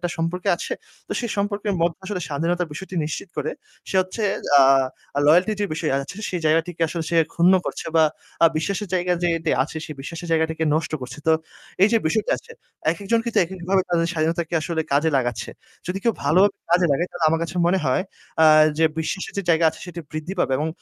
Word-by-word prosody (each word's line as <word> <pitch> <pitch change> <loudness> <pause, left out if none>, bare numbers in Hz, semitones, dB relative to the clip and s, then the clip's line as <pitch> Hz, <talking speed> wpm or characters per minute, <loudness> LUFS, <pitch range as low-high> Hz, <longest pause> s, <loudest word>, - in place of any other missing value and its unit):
একটা 175 -1 -2
সম্পর্কে 165 +2 -2
আছে - - -5 0.4
তো - - -3
সে 240 - -2
সম্পর্কের 200 0 -1
মধ্যে 170 -1 +1
আসলে 190 -2 -3
স্বাধীনতার 170 +4 -1
বিষয়টি 190 +4 -8
নিশ্চিত 160 +4 -5
করে। - - -1 0.4
সে 190 - -1
হচ্ছে 185 +4 -4 0.9
আ 145 - +2
loyalty-র 180 +7 +4
যে 205 - +1
বিষয় 155 - -1
আছে 140 +7 -4
সেই 180 - -2
জায়গাটিকে 165 +2 +1
আসলে 165 +1 -3
সে 170 - +1 0.2
ক্ষুন্ন 175 +2 +5
করছে - - -4
বা 160 - +6 0.4
আ - - +10
বিশ্বাসের 200 +4 -2
জায়গা 180 0 +1
যে 175 - +3
এতে 165 - -2
আছে 150 +4 -7
সেই 155 - -7
বিশ্বাসের 165 +5 -7
জায়গাটিকে 160 0 +1
নষ্ট 155 -1 -1
করছে। 125 +2 -8
তো 160 - +5 0.5
এইযে 225 +3 +4
বিষয়টা 210 +6 0
আসছে 465 - -13 0.4
একেকজনকে 225 +6 -1
তো - - +4
একেকভাবে 190 +2 -1
তাদের 170 -1 +1
স্বাধীনতাকে 165 +1 -1
আসলে 160 +1 -2
কাজে 150 +3 +3
লাগাচ্ছে। 120 -3 -2 0.4
যদি 185 +2 -3
কেউ 230 - +3
ভালো 150 +5 +3
ভাবে 200 - -17 0.2
কাজে 175 0 +4
লাগায় 170 +6 0
তাহলে 175 -2 -2
আমার 165 +1 +1
কাছে 170 +2 -5
মনে 185 +2 +3
হয় 130 +7 +2 0.4
আ - - +8 0.3
যে 160 - +4
বিশ্বাসের 175 +4 -3
যে - - 0
জায়গা 165 0 +3
আছে - - -14
সেটি 175 -1 -7
বৃদ্ধি 155 +4 -4
পাবে 135 - +1
এবং 155 +2 -1
170 Hz, 200 wpm, -23 LUFS, 160-185 Hz, 0.9 s, আ